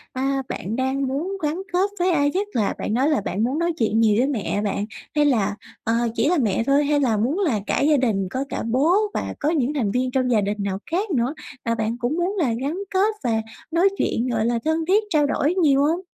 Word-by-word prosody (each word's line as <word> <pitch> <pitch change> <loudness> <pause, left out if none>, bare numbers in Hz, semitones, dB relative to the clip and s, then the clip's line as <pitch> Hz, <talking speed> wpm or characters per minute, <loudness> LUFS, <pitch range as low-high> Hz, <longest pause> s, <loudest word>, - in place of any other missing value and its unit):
thì, 260 - -2
a, 270 0 0
bạn 205 +5 -4
đang 265 +1 0
muốn 335 +9 -3
gắn 310 +5 -1
kết 380 +3 +2
với 360 +1 +2
ai 285 -3 +2
nhất? 400 +3 -1
Là 215 -3 +1
bạn 215 - -2
nói 265 +6 +2
là 295 -9 +1
bạn 205 +3 -2
muốn 270 +7 0
nói 340 0 +1
chuyện 225 -1 +1
nhiều 215 -2 +4
với 260 +3 +3
mẹ 210 -6 -1
bạn 205 0 -1 0.3
hay 295 - +4
là, 210 -7 +2 0.3
ờ, 225 - 0 0.2
chỉ 295 - +2
là 355 - +2
mẹ 225 -4 +1
thôi? 280 +1 +3
Hay 290 0 +2
là 235 -6 +2
muốn 265 - 0
là 280 - +1
cả - - +1
gia 295 +1 +4
đình, 210 -7 0
có 260 +5 -2
cả - - -3
bố 270 +9 +2 0.2
và - - -3
có 295 - +1
những 295 -3 +1
thành 230 -9 0
viên 250 +3 0
trong 255 -1 +1
gia 215 - +3
đình 205 +1 -2
nào 195 -1 -2
khác 385 +4 -1
nữa, 255 0 +1 0.3
à, 230 0 0
bạn 225 +1 -2
cũng 245 +7 -1
muốn 365 +4 0
là 255 -8 +1
gắn 295 +6 -2
kết 410 +3 +1
và 225 -2 +1 0.3
nói 350 +4 +4
chuyện, 235 +3 0
gọi 225 -2 0
là 235 0 +1
thân 320 0 +1
thiết 415 +4 +4
trao 300 -4 +3
đổi 290 +4 +1
nhiều 285 -6 +4
hông? 325 +4 +1
270 Hz, 255 wpm, -23 LUFS, 230-315 Hz, 0.3 s, nhiều